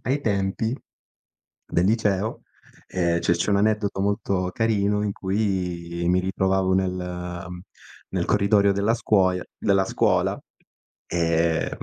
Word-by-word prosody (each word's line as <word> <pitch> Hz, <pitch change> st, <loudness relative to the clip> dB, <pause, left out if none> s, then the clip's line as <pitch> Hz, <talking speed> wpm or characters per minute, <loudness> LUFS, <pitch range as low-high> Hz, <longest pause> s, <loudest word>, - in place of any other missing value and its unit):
ai 135 Hz, +3 st, 0 dB
tempi 105 Hz, +1 st, -1 dB, 0.9 s
del 85 Hz, -, +1 dB
liceo 105 Hz, -1 st, 0 dB, 0.5 s
ehm, 85 Hz, -2 st, 0 dB
cioè, 85 Hz, -, +2 dB
c'è 85 Hz, -, -1 dB
un 100 Hz, -, +3 dB
aneddoto 105 Hz, -1 st, +1 dB
molto 100 Hz, -2 st, 0 dB
carino 105 Hz, -2 st, +1 dB
in 105 Hz, -, -1 dB
cui 90 Hz, -4 st, -2 dB
mi 90 Hz, +1 st, +3 dB
ritrovavo 95 Hz, 0 st, +1 dB
nel, 95 Hz, -1 st, 0 dB
ehm, 90 Hz, 0 st, -6 dB, 0.5 s
nel -, -, -1 dB
corridoio 100 Hz, 0 st, +3 dB
della 100 Hz, +3 st, +1 dB
scuoia 95 Hz, -5 st, +2 dB
della 95 Hz, -2 st, +2 dB
scuola. -, -, +1 dB, 0.7 s
Ehm, 85 Hz, -1 st, +1 dB
95 Hz, 120 wpm, -24 LUFS, 90-105 Hz, 0.9 s, un